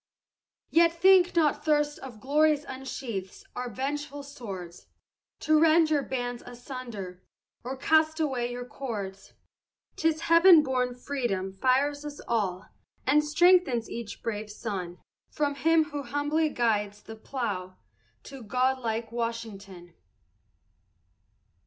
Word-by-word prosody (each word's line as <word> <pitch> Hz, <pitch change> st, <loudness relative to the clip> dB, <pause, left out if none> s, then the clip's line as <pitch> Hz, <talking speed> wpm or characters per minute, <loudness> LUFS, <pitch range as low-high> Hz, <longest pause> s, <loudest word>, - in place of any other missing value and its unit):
Yet 335 Hz, 0 st, +5 dB
think 370 Hz, -1 st, +5 dB
not 300 Hz, -3 st, +2 dB
thirst 295 Hz, -1 st, +1 dB
of 245 Hz, -5 st, -10 dB
glory 300 Hz, +5 st, +3 dB
unsheaths 260 Hz, -8 st, -7 dB
our 250 Hz, 0 st, -4 dB
vengeful 285 Hz, +4 st, -4 dB
swords 195 Hz, -11 st, -9 dB, 0.5 s
To 310 Hz, 0 st, +4 dB
rend 320 Hz, 0 st, +5 dB
your 295 Hz, -2 st, +3 dB
bands 245 Hz, -2 st, -4 dB
asunder, 240 Hz, -7 st, -8 dB, 0.4 s
or 260 Hz, +2 st, -5 dB
cast 315 Hz, +3 st, +2 dB
away 255 Hz, -6 st, -1 dB
your 245 Hz, 0 st, -5 dB
cords, 205 Hz, -7 st, -6 dB, 0.6 s
'Tis 320 Hz, 0 st, +1 dB
heaven 335 Hz, -1 st, +7 dB
born 250 Hz, -2 st, -1 dB
freedom 240 Hz, -8 st, -3 dB
fires 270 Hz, +7 st, +1 dB
us 295 Hz, -1 st, -7 dB
all, 205 Hz, -5 st, -1 dB, 0.4 s
and 295 Hz, +3 st, +4 dB
strengthens 300 Hz, -6 st, +3 dB
each 230 Hz, -3 st, -7 dB
brave 215 Hz, -2 st, -4 dB
son, 190 Hz, -5 st, -5 dB, 0.3 s
From 290 Hz, -2 st, -1 dB
him 320 Hz, +2 st, +2 dB
who 290 Hz, 0 st, -3 dB
humbly 290 Hz, +4 st, 0 dB
guides 210 Hz, -5 st, -1 dB
the 220 Hz, -, -9 dB
plough, 205 Hz, -6 st, -4 dB, 0.5 s
to 270 Hz, -2 st, -10 dB
god 255 Hz, +4 st, 0 dB
like 225 Hz, -1 st, -3 dB
Washington. 210 Hz, -7 st, -5 dB
255 Hz, 120 wpm, -28 LUFS, 220-295 Hz, 0.6 s, heaven